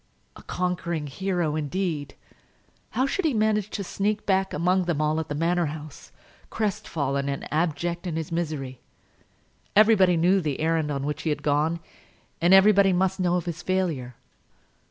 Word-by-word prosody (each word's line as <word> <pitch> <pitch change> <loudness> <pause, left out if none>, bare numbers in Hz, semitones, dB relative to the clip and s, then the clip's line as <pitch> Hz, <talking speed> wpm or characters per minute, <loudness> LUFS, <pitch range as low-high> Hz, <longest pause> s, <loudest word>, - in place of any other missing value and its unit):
A - - -12
conquering 175 -3 -2
hero, 175 +1 -1
indeed! 155 -2 -3 0.8
How 260 - +3
should 380 +8 -1
he 305 -6 +1
manage 215 -1 +1
to 200 - -4
sneak 205 +3 -2
back 190 -1 +1
among 180 +3 +1
them 170 -4 -1
all 155 +1 +1
at 160 - -5
the 145 - -2
Manor 170 +2 +1
House, 150 -1 -9 0.4
crestfallen 145 -10 -2
and 140 - -4
abject 170 +2 -1
in 165 - -3
his 160 -1 -4
misery? 150 -6 -3 0.9
Everybody 200 -4 +5
knew 185 +4 +3
the 150 -5 -2
errand 160 -1 +1
on 140 -1 -2
which 150 0 -3
he 160 - -2
had 145 -1 -2
gone, 155 +3 +1 0.6
and 175 +2 +4
everybody 195 0 +6
must 190 +1 +1
know 180 -1 +2
of 180 - -1
his 170 0 -5
failure. 165 -11 -1
170 Hz, 160 wpm, -25 LUFS, 150-190 Hz, 0.9 s, everybody